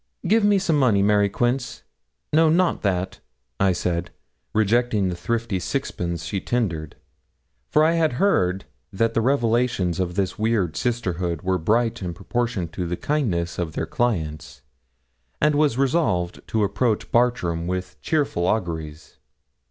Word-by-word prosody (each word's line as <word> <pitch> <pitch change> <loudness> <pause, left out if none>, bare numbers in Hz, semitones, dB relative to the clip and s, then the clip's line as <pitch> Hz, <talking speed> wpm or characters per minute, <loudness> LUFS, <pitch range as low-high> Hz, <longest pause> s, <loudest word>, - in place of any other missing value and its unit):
'Give 220 +3 +4
me 205 -1 +4
some 170 -6 +1
money, 110 -7 +3
Mary 105 0 +3
Quince. 120 +3 -1 0.5
No, 160 +1 +5
not 175 +2 +2
that,' 95 -2 -1 0.4
I 95 -1 +4
said, 85 -1 -2 0.4
rejecting 110 -2 +2
the 90 - -3
thrifty 115 0 -2
sixpence 85 - -3
she 95 +3 -3
tendered, 85 -11 -2 0.7
for 155 - +4
I 160 - +4
had 165 -4 +2
heard 95 - +1 0.3
that 115 +3 0
the 115 - +2
revelations 120 -7 +1
of 90 -2 -2
this 95 0 -1
weird 105 -7 +1
sisterhood 90 -8 -2
were 95 0 +1
bright 115 +7 +1
in 90 -2 -4
proportion 115 -3 -2
to 90 +1 -4
the 90 +1 -3
kindness 95 - -1
of 85 -3 -3
their - - -2
clients, 75 - -2 0.8
and 150 0 +3
was 145 -4 +2
resolved 130 - +1
to 110 -1 0
approach 105 +3 0
Bartram 90 -9 +1
with 90 0 -4
cheerful 140 - 0
auguries. 80 -7 -3
105 Hz, 145 wpm, -23 LUFS, 90-125 Hz, 0.8 s, No